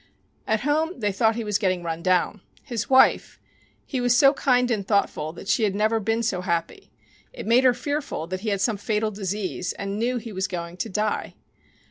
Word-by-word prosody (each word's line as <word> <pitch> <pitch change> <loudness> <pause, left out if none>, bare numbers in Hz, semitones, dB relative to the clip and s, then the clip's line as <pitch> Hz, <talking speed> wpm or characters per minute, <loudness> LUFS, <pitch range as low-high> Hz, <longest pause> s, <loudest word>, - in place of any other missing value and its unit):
At 220 -1 +1
home 310 +5 0
they 210 -3 0
thought 220 +3 +2
he 230 - -3
was 210 -1 0
getting 185 -4 0
run 165 0 -3
down. 185 +2 +1 0.2
His 230 -4 -4
wife! 265 0 +4 0.5
He 260 -3 -3
was 245 0 +3
so 275 +2 +6
kind 250 -3 +2
and 210 -4 0
thoughtful 155 -7 0
that 185 - -11
she 205 - +2
had 200 -2 +1
never 215 +2 +2
been 225 +2 0
so 190 -5 -1
happy. 170 -2 -3 0.4
It - - -8
made 235 +3 +4
her 255 - +6
fearful 285 - -3
that 185 +2 -4
he 215 +3 -3
had 200 -2 -1
some 215 +1 +1
fatal 215 +1 -1
disease 195 -2 -3
and 200 +1 -4
knew 245 +2 0
he 230 -2 -7
was 190 0 -1
going 175 -1 -6
to - - -3
die. 210 +2 -2
215 Hz, 205 wpm, -24 LUFS, 190-240 Hz, 0.5 s, so